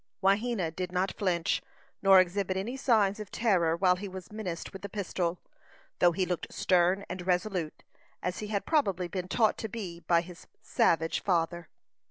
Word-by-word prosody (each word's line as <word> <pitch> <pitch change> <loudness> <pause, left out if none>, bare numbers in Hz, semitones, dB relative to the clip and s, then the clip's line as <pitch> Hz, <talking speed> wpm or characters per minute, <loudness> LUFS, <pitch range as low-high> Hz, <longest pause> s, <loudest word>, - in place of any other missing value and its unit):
Wahena 195 -4 +1
did 180 -1 -3
not 185 +1 0
flinch, 175 -4 0 0.4
nor 195 -1 +7
exhibit 185 +1 +1
any 220 +7 -3
signs 220 -6 +2
of 210 -3 -7
terror 175 -8 +2
while 180 0 +3
he 200 +2 -5
was 185 0 -9
menaced 200 -6 -5
with 195 - -8
the 200 - -6
pistol, 180 -3 -2 0.6
though 175 - +5
he 185 +2 0
looked 180 -1 -3
stern 185 +2 +2
and 180 0 -6
resolute, 180 -3 -1 0.4
as 180 +1 -2
he 210 - -5
had 205 -1 -2
probably 195 - +1
been 180 0 -4
taught 220 +2 +2
to 220 - -4
be 190 -6 -6
by 170 -1 +2
his 180 +1 -12 0.2
savage 165 0 +1
father. 170 -2 0
185 Hz, 175 wpm, -29 LUFS, 175-200 Hz, 0.6 s, nor